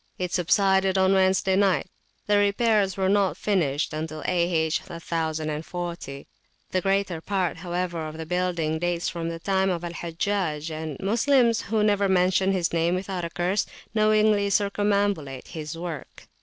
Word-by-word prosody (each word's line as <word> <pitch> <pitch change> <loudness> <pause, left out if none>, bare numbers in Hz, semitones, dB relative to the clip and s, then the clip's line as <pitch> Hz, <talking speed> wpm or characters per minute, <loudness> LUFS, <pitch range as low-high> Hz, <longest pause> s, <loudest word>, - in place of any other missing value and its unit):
It 180 -1 -3
subsided 190 +1 +3
on 190 0 +4
Wednesday 190 0 +3
night. 195 -1 +2 0.4
The 205 0 +3
repairs 205 -1 +2
were 190 -1 +1
not 200 -1 +2
finished 160 -8 0
till 155 0 -5
A.H. 170 -3 +1
1040. 160 -2 -4 0.4
The 185 - +1
greater 195 -3 0
part, 190 -1 -1
however, 175 -2 -3
of 155 +1 -8
the 160 - -5
building 170 -2 -1
dates 175 0 -1
from 165 -2 -4
the 165 - -4
time 190 +2 +1
of 175 -2 -2
Al 170 -1 -5
Hajjaj; 170 -2 -2
and 155 -2 -5
Moslems, 235 +3 +3
who 220 -1 +2
never 205 -2 +2
mention 190 +1 +3
his 180 -3 0
name 170 +1 +2
without 185 -1 -3
a - - -4
curse, 180 +4 0 0.3
knowingly 215 -1 +3
circumambulate 200 -8 0
his 155 -1 -6
work. 170 -2 -7
180 Hz, 150 wpm, -25 LUFS, 165-200 Hz, 0.4 s, on